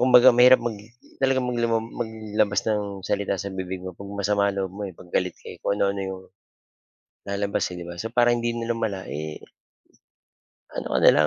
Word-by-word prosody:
kumbaga 125 0 +8
mahirap 125 +2 +7
mag 120 - 0 0.5
talaga 135 0 +3
maglamang 115 -2 0
maglabas 110 -2 0
ng 105 -2 +1 0.2
salita 100 -1 0
sa 100 +1 -5
bibig 95 0 -5
mo 95 - -5
'pag 100 +3 -9
masama 100 0 +2
ang 100 - -3
loob 95 -1 -2
mo, 105 +1 -7
eh, 90 - -12
'pag 90 - -15
galit 90 -2 0
ka, - - -19
eh. - - -13
Kung 100 - 0
ano-ano 100 -1 +1
'yong 95 0 -6 1.1
lalabas, 100 0 0
eh, - - -6
'di 85 - -6
ba? 85 - -6
So 115 - -3
para 120 0 +4
hindi 120 0 0
na 115 0 -1
lumala, 110 -5 -2
eh 75 +1 -5 1.4
ano - - -4
ka - - +4
na - - +8
lang, 75 - +5
100 Hz, 200 wpm, -25 LUFS, 95-115 Hz, 1.4 s, kumbaga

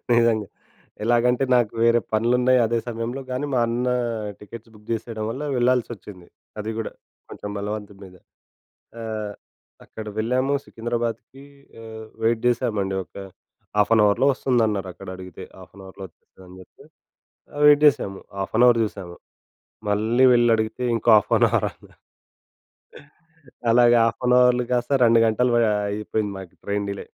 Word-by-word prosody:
నిజంగా. 115 -3 +2 0.6
ఎలాగంటే 120 +2 +2
నాకు 120 -4 +1
వేరే 115 0 +4
పనులున్నాయి 125 +3 +3
అదే 115 +1 0
సమయంలో. 120 +3 -4
కానీ 130 +3 -2
మా - - +2
అన్న 120 +2 -1 0.5
టికెట్స్ 115 +2 -12
బుక్ 105 0 -19
చేసేయడం 110 -1 -4
వల్ల 135 +5 -5
వెళ్ళాల్సొచ్చింది. 120 -7 -2 0.3
అది 110 +1 -4
గూడా 110 - -4 0.4
కొంచెం 105 - -7
బలవంతం 105 -1 -6
మీదే. 90 -2 -15 0.8
ఆహ్, 110 -2 -5 0.5
అక్కడ 110 -1 -10
వెళ్ళాము 130 +5 0
సికింద్రాబాద్‌కి 120 +3 -5 0.4
ఆహ్, 110 -1 -9 0.2
వెయిట్ 115 0 +1
చేశామండి. 110 -6 -1
ఒక - - -40 0.6
హాఫ్ 105 +2 +3
అన్ 110 - +5
అవర్‌లో 115 +6 +2
ఒస్తుందన్నారక్కడడిగితే 95 - -3
హాఫ్ - - -15
అన్ 95 - -12
అవర్‌లో 95 +1 -10
ఒచ్చేస్తుందని 90 +2 -18
చెప్పి - - -20 0.7
ఆహ్, 145 - -3
వెయిట్ 150 0 +6
చేశాము. 100 -8 -3 0.2
హాఫ్ 95 +2 -4
అన్ 125 - +6
అవర్ 115 -1 +3
చూసాము. 95 -4 -7 0.7
మళ్ళీ 115 +5 +3
వెళ్లడిగితే 115 0 +1
ఇంకో 115 - +1
హాఫ్ 105 - 0
అన్ - - +5
అవరన్నారు - - -3 1.7
అలాగ 120 0 +5
హాఫ్ 115 +2 -3
అన్ 125 0 +5
అవర్‌లు 125 0 +3
గాస్త 125 +3 +1
2 115 0 +5
గంటలు 120 +3 +1
వ - - +4 0.3
అయిపోయింది 105 0 -3
మాకు 95 -3 -11
ట్రైన్ 100 0 -2
డిలే. 100 - -7
115 Hz, 135 wpm, -23 LUFS, 105-120 Hz, 1.7 s, వెయిట్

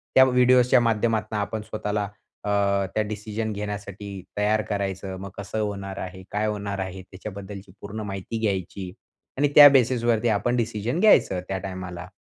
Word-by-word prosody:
त्या 130 - +9
व्हिडिओजच्या 125 0 +5
माध्यमातून 110 -2 0
आपण 105 +1 -3
स्वतःला 105 -1 -3 0.4
अ, - - 0 0.5
त्या 110 - +2
डिसिजन 110 +1 -4
घेण्यासाठी 105 -1 -6 0.3
तयार 105 +1 +2
करायचं. 95 -2 -3
मग 100 +1 -7
कसं 100 +2 -4
होणार 100 -2 -3
आहे? 95 0 -7
काय 105 +1 0
होणार 100 -2 -3
आहे? 95 0 -4
त्याच्याबद्दलची 100 +1 -9
पूर्ण 105 +2 -6
माहिती 95 +4 -4
घ्यायची 95 -3 -2 0.5
आणि 145 0 +3
त्या 145 -1 +12
बेसिसवरती 120 -3 +2
आपण 110 +3 +1
डिसिजन 115 - -1
घ्यायचं 185 - +5
त्या 95 - -2
टायमाला. 95 -2 -6
105 Hz, 145 wpm, -25 LUFS, 95-115 Hz, 0.5 s, त्या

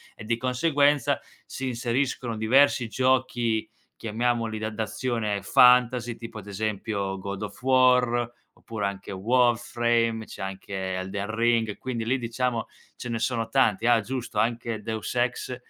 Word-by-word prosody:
E 110 - -10
di 115 +1 0
conseguenza 140 +1 +2 0.3
si 135 - -5
inseriscono 120 -1 -1
diversi 125 +2 +4
giochi 120 -3 +1 0.3
chiamiamoli 115 0 -1
da 110 - -2
d'azione 110 -1 -2
fantasy, 125 +2 +4
tipo 115 -1 -9
ad 105 - -12
esempio 100 -1 -3
God 100 +1 -5
of 100 - -8
War, 125 -2 +3 0.2
oppure 110 -3 -5
anche 100 0 -6
Warframe, 120 +1 +1
c'è - - -10
anche 95 0 -4
Elden 95 +2 -4
Ring, 115 -1 +2
e 105 - -5
quindi 120 -3 -4
lì 125 +4 +1
diciamo 120 -1 -2 0.3
ce 125 - -7
ne 115 - -2
sono 115 -1 -1
tanti. 110 -1 +2
Ah 120 -1 +5
giusto, 120 -1 -4
anche 115 -1 -1
Deus 110 0 -4
Ex 125 +1 -1
115 Hz, 140 wpm, -26 LUFS, 110-125 Hz, 0.3 s, Ah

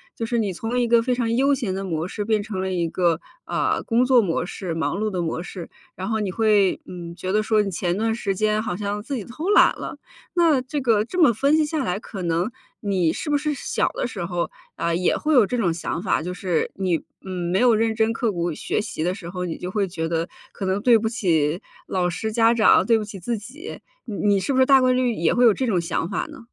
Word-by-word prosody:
就 230 - -3
是 235 +1 -1
你 205 -4 0
从 225 +7 -2
一 240 - +1
个 235 0 +5
非 250 +2 0
常 230 -2 0
悠 275 +3 +3
闲 235 -8 -3
的 195 - -3
模 165 -2 -2
式 205 +2 -4
变 215 0 +1
成 200 -3 -4
了 190 0 -2
一 175 -2 0
个， 170 -2 +1 0.3
呃， - - 0
工 240 +2 +2
作 250 -2 +5
模 175 -4 -1
式， 180 -1 -5
忙 160 +3 -1
碌 215 +1 0
的 180 -2 -2
模 165 0 -2
式， 180 -2 -8 0.3
然 190 +1 -5
后 220 -1 0
你 200 -3 -2
会， 210 -2 +3
嗯， 175 -2 -8
觉 185 +1 -4
得 215 - +3
说 215 0 +3
你 205 - -2
前 175 0 -1
段 225 +1 +1
时 200 -4 -1
间 215 +1 +1
好 215 -5 -3
像 205 0 -3
自 275 +4 -4
己 220 - -5
偷 305 +10 -5
懒 415 - +6
了。 - - -6 0.4
那 330 -6 +4
这 275 +4 -4
个 225 -5 +3
这 360 +11 -2
么 290 -8 +6
分 275 +7 +2
析 310 - +3
下 300 -1 -2
来， 180 0 -1
可 200 -3 -8
能 170 +5 0 0.3
你 185 -5 +1
是 310 - -5
不 295 - +3
是 300 +1 -1
小 275 - -1
的 - - -2
时 205 -7 -5
候， 175 -1 -2 0.3
呃， 170 0 -1
也 180 +1 +1
会 310 0 0
有 245 -6 +6
这 250 - -2
种 185 -8 +1
想 165 0 -4
法， 185 - +1
就 180 +3 -4
是 180 -3 -1
你， 185 -3 0 0.3
嗯， 180 -2 -4
没 190 - +2
有 245 0 +5
认 225 0 +1
真 220 0 +2
刻 230 -1 0
苦 170 -2 -2
学 185 - -2
习 215 -7 -4
的 180 +2 0
时 180 -5 -8
候， 180 0 -4
你 170 - -4
就 180 - -5
会 200 -1 0
觉 165 -3 -3
得， 165 0 -1 0.3
可 195 - -5
能 190 +2 0
对 240 0 +6
不 220 +1 -1
起 170 -7 +1 0.3
老 180 -2 0
师 220 +5 -3
家 230 0 +4
长， 230 -2 +5
对 230 -1 +4
不 220 - -2
起 205 -2 -8
自 230 +6 -2
己。 270 - -9 0.3
你 220 - -5 0.2
你 - - +2
是 190 - -2
不 260 - +2
是 260 - +6
大 270 0 +6
概 255 0 +4
率 250 -1 +2
也 170 -6 +1
会 245 0 +5
有 225 - +7
这 260 - -2
种 195 -6 +2
想 170 0 -2
法 200 - -2
呢？ - - -11
210 Hz, 285 characters per minute, -23 LUFS, 180-235 Hz, 0.4 s, 有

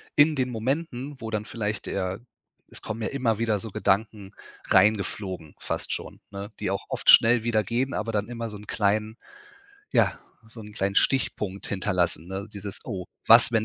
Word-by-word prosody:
in 150 +1 +6
den 130 -1 0
Momenten, 135 +3 -2
wo 110 -1 -6
dann 105 -1 -2
vielleicht 110 -2 -3
eher 95 +1 -2 0.5
es - - -10
kommen 110 +1 -5
ja - - -1
immer 120 -6 0
wieder 110 -3 +1
so 110 - -6
Gedanken 100 0 0 0.4
reingeflogen, 95 -4 +2
fast - - -3
schon, - - -6
ne, 100 +2 -6
die 95 - -1
auch 100 - -3
oft - - +4
schnell 115 0 +7
wieder 110 -2 +2
gehen, 125 +6 -1
aber 115 +2 -2
dann 105 -1 -1
immer 115 -1 -5
so 105 - -7
'n 105 - -12
kleinen 110 +1 0 0.8
ja, - - +3 0.3
so 115 0 -10
'n 105 0 -10
kleinen 100 -1 -1
Stichpunkt 105 -7 +1
hinterlassen, 90 -3 0
ne? 95 +2 -4
Dieses: 100 0 -6
„Oh, 95 -5 -5 0.2
was, 115 +1 +8
wenn 110 -2 +2
110 Hz, 180 wpm, -26 LUFS, 100-115 Hz, 0.8 s, was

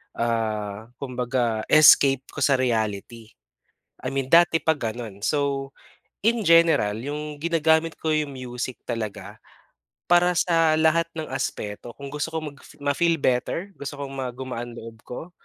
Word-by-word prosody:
ah, 110 -2 -2
kumbaga 125 -4 -1
escape 140 -3 +7
ko - - -8
sa 135 0 +4
reality. 115 -2 -2 0.8
I 130 - -3
mean 135 -1 -1
dati 170 -1 +6
pa 160 - +3
ganun. 115 -6 -6
So, 140 -1 -1 0.5
in 230 +1 +2
general, 165 -11 +5
yung 150 +1 -5
ginagamit 160 -1 +2
ko 160 - -2
yung 150 -2 0
music 125 0 -5
talaga 115 -4 -5 0.7
para 175 0 +5
sa 165 -3 +3
lahat 160 +1 +3
ng 155 - -3
aspeto, 115 -3 -4
kung 140 0 -8
gusto 150 +2 -2
kong 155 -2 -4
mag-fi - - -17
ma-feel 165 +4 +2
better 135 +9 -1
gusto 140 +1 -6
kong 140 -1 -6
ma 130 -1 -3
gumaan 125 -2 -6
loob 115 -1 -10
ko, 160 +8 -8
135 Hz, 145 wpm, -24 LUFS, 120-160 Hz, 0.8 s, escape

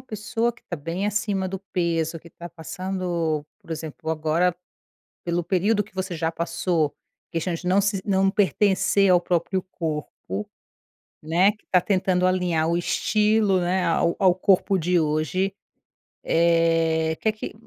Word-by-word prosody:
pessoa 225 +1 -2
que - - -23
tá 175 - -5
bem 165 +7 -3
acima 205 -2 -1
do 190 +1 -4
peso, 165 -2 0
que 170 +1 -16
tá 175 +2 -9
passando 170 -2 -3 0.2
por - - -18
exemplo, 160 0 -5
agora 160 +3 +1 0.7
pelo 175 0 0
período 200 +5 +1
que 200 -1 -21
você 190 -1 -3
já 160 0 0
passou, 165 -2 -1 0.4
questão 170 +2 -1
de 180 +2 -7
não 190 +2 +4
se 200 -1 0
não 195 -1 +3
pertencer 195 -1 +2
ao 175 -1 +5
próprio 180 +2 0
corpo, 150 - -5 0.8
né, 180 +6 +3
que 210 - -29
tá 180 - +6
tentando 185 -2 +1
alinhar 175 -3 +1
o 170 - +1
estilo, 210 +1 +2
né, 180 +1 0
ao 170 0 +1
ao 185 -3 +4
corpo 190 +1 +3
de 175 +1 +2
hoje, 155 +5 0 0.7
eh, 165 -1 +2
que 220 - +1
que 215 - -7
180 Hz, 150 wpm, -24 LUFS, 165-195 Hz, 0.8 s, tá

